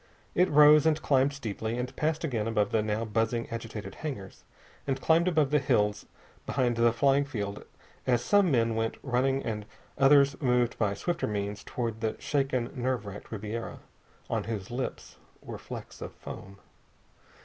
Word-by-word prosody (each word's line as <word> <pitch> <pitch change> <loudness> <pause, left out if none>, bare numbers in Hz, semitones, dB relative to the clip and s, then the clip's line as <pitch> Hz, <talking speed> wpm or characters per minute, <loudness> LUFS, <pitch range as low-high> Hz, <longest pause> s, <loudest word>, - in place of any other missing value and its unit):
It 180 +1 +3
rose, 150 +1 +7
and 155 -1 +3
climbed 135 -2 +3
steeply, 115 -4 -4
and 125 +2 -4
passed 155 +1 -1
again 115 -9 -1
above 105 -2 +1
the 110 - +2
now 110 +1 -1
buzzing, 115 +2 0
agitated 115 -2 -6
hangars, 125 -12 -7 0.4
and 135 -1 0
climbed 165 +2 +3
above 155 -6 +2
the 150 - +4
hills 105 -7 +1 0.4
behind 125 -3 +1
the 115 0 +4
flying 140 +4 +3
field 105 -7 -5 0.4
as 120 -1 +2
some 200 +6 +4
men 115 -5 +2
went 115 0 -1
running 135 +1 +1
and 110 -3 -3 0.4
others 140 +1 +5
moved 125 -3 +2
by 100 -3 +1
swifter 175 - -2
means 105 0 -3
toward 115 -3 -4
the 110 -1 -1
shaken, 135 -4 -1
nerve 125 -4 -2
racked 100 0 -9
Ribiera, 110 +1 -5 0.5
on - - -2
whose 110 -1 -5
lips 125 +1 -5 0.2
were - - -8
flecks - - -9
of - - -6
foam. 95 +1 -10
120 Hz, 160 wpm, -29 LUFS, 110-140 Hz, 0.5 s, rose